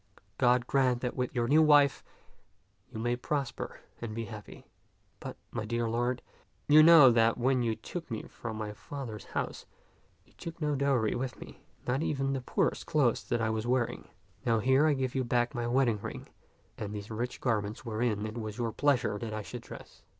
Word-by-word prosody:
God 125 0 +4
grant 130 -2 +2
that 125 - -2
with 125 +1 -2
your 120 -1 +1
new 150 +5 +5
wife 145 -2 +5 0.9
you - - -7
may 120 +2 0
prosper 135 0 -4 0.2
and 110 -2 -5
be 115 0 -3
happy. 105 -2 -10 0.5
But, - - -7
my - - -3
dear 115 +1 -1
lord, 120 +2 -1 0.4
you 150 +1 +8
know 155 -5 +9
that 115 -1 +3
when 130 +1 +2
you 115 -2 0
took 170 +5 -7
me 110 -3 -4
from 110 -2 -7
my 105 -1 -4
father's 115 -2 -7
house, - - -4 0.6
you - - -27
took 165 0 -8
no 150 -2 0
dowry 135 -6 +1
with 125 0 -3
me, - - -11 0.2
not 130 +3 0
even 135 -3 0
the 135 - -2
poor - - +1
clothes 140 -7 +1
that 120 -1 -1
I 110 0 +1
was 110 +1 -2
wearing. 125 -1 0 0.4
Now 115 -1 +2
here 130 +7 +4
I 155 - +4
give 130 -2 -2
you 130 - 0
back 120 +1 +1
my 120 -2 -2
wedding 120 -4 +2
ring - - -7 0.5
and 105 0 -4
these 105 +1 -7
rich 120 +3 -3
garments 110 0 -1
wherein 110 -2 -1
it 110 +2 -5
was 110 -2 -5
your 115 -2 -1
pleasure 125 -6 +1
that 110 -1 -4
I 110 - -4
should - - -7
dress. - - -12
120 Hz, 195 wpm, -30 LUFS, 110-135 Hz, 0.9 s, know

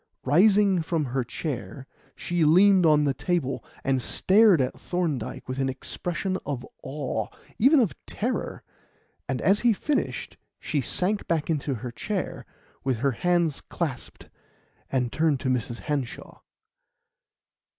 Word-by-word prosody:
Rising 195 +5 +4
from 160 -2 -1
her 130 0 -1
chair, 125 - -5 0.3
she 175 -1 -1
leaned 185 +3 +6
on 150 -1 +5
the 140 -2 +2
table 150 -5 -1 0.2
and 135 -2 +1
stared 195 - +4
at 130 -1 -1
Thorndyke 160 -10 -3
with 130 +1 -4
an 135 0 +1
expression 180 +7 -3
of 135 -3 -4 0.2
awe 135 -6 -3 0.3
even 275 +6 +6
of 225 -8 +2
terror; 245 +4 -3 0.7
and - - -1
as 200 +2 +4
he 235 -2 +4
finished 290 +7 -2 0.2
she 145 - -1
sank 195 - -1
back 165 -1 0
into 145 -3 -1
her 120 +1 -6
chair, 195 - -4 0.4
with 130 -3 0
her 135 +4 +1
hands 170 +2 +1
clasped, 155 -8 -5 0.6
and 125 -3 0
turned 155 -4 +1
to 130 - -1
Mrs. 120 -1 -2
Hanshaw. 145 -5 -4
150 Hz, 135 wpm, -26 LUFS, 130-185 Hz, 0.7 s, leaned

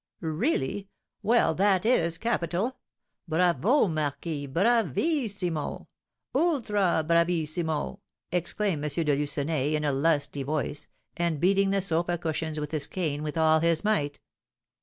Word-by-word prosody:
"Really! 190 - -1 0.3
Well, 225 -8 +3
that 190 +2 +2
is 170 -9 +2
capital! 205 +2 -1 0.5
Bravo, 180 - +3
marquis, 150 -1 -3
bravissimo! 200 - 0 0.4
ultra 215 - +1
bravissimo!" 170 0 0 0.3
exclaimed 180 -2 -1
M. 155 +2 0
de 145 -1 +3
Lucenay, 145 +1 0
in 150 - -1
a 145 - +2
lusty 145 0 0
voice, 145 +1 -2 0.3
and 170 -3 0
beating 195 +3 +3
the 195 -1 +1
sofa 175 -1 0
cushions 160 -1 -3
with 150 -1 -4
his 155 -3 0
cane 155 -6 -2
with 155 +1 -4
all 160 0 +4
his 165 0 +2
might. 150 -9 0
165 Hz, 120 wpm, -27 LUFS, 150-195 Hz, 0.5 s, all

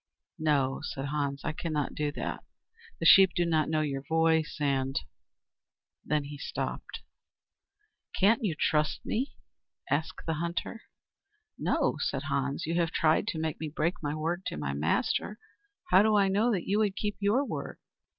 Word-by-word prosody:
"No," 140 -4 +1
said 135 -3 -4
Hans, 140 -2 -2
"I - - 0
cannot 150 -3 -2
do 150 -1 -1
that. - - -4 0.6
The - - -3
sheep 190 -1 +8
do 175 - +2
not 155 -3 +1
know 155 -1 +1
your 140 -3 -2
voice 160 +2 +1
and 135 -2 +1 0.5
" - - -65
Then 150 -1 0
he 145 0 -8
stopped. - - -5 1.2
"Can't 220 +4 +4
you 180 -7 0
trust 150 0 +1
me?" 255 +5 -2 0.6
asked 155 +3 -1
the 160 - 0
hunter. 170 +6 -3 0.7
"No," - - 0
said - - -1
Hans. 140 0 -1
"You 165 - -2
have 170 -1 +2
tried 160 +5 +2
to 180 -8 -2
make 160 -1 -2
me 155 - -3
break 160 +3 0
my 145 -1 -2
word 165 +4 -2
to - - -4
my 70 -2 -2
master. 75 - 0 0.5
How 190 - +8
do 215 0 +3
I 200 -1 +4
know 215 +5 +2
that 190 -6 -2
you 205 +2 +2
would 205 -3 +1
keep 210 0 -2
your 210 +8 +2
word?" - - -5
160 Hz, 170 wpm, -29 LUFS, 145-190 Hz, 1.2 s, sheep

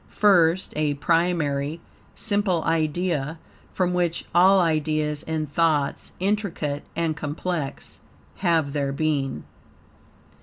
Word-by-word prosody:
First 185 -3 +3
a 150 -1 0
primary, 160 -2 0 0.4
simple 205 -6 0
idea, 160 -1 0 0.3
from 180 -1 0
which 175 -2 0
all 190 +3 +6
ideas 155 -3 0
and 160 -1 -2
thoughts, 150 -1 0
intricate 185 -7 -1
and 165 -1 0
complex, 150 0 -4 0.4
have 165 -6 +1
their 140 -2 -1
being. 140 -2 -1
160 Hz, 100 wpm, -24 LUFS, 150-175 Hz, 0.4 s, all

